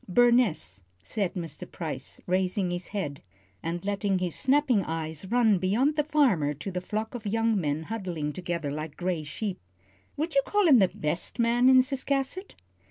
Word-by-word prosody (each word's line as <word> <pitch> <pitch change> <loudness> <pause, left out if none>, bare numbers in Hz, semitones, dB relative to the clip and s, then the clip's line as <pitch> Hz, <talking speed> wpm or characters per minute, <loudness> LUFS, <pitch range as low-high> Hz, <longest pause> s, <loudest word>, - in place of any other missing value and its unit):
"Burness," 235 - +3 0.2
said 195 - -2
Mr. 175 0 -6
Price, 150 -6 -6
raising 185 0 0
his 175 0 -4
head, 180 -9 -4 0.4
and 170 +2 -4
letting 200 -1 0
his 180 -2 -2
snapping 265 -5 +3
eyes 160 +1 -4
run 225 -3 +3
beyond 230 - +2
the 300 - +2
farmer 245 - +2
to 150 +8 -6
the 180 0 -3
flock 215 +4 -3
of 230 -3 -5
young 225 +2 +2
men 150 0 -1
huddling 175 -7 -3
together 170 -4 -3
like 155 +1 -5
gray 175 -3 -1
sheep. 190 +6 -4 0.6
"Would 315 +3 -2
you 275 - +5
call 415 -3 +2
him 270 -6 +7
the 190 - +5
best 160 +5 -4
man 240 +2 +4
in 260 -1 +7
Ciscasset?" 275 +7 -2
195 Hz, 165 wpm, -28 LUFS, 165-245 Hz, 0.6 s, him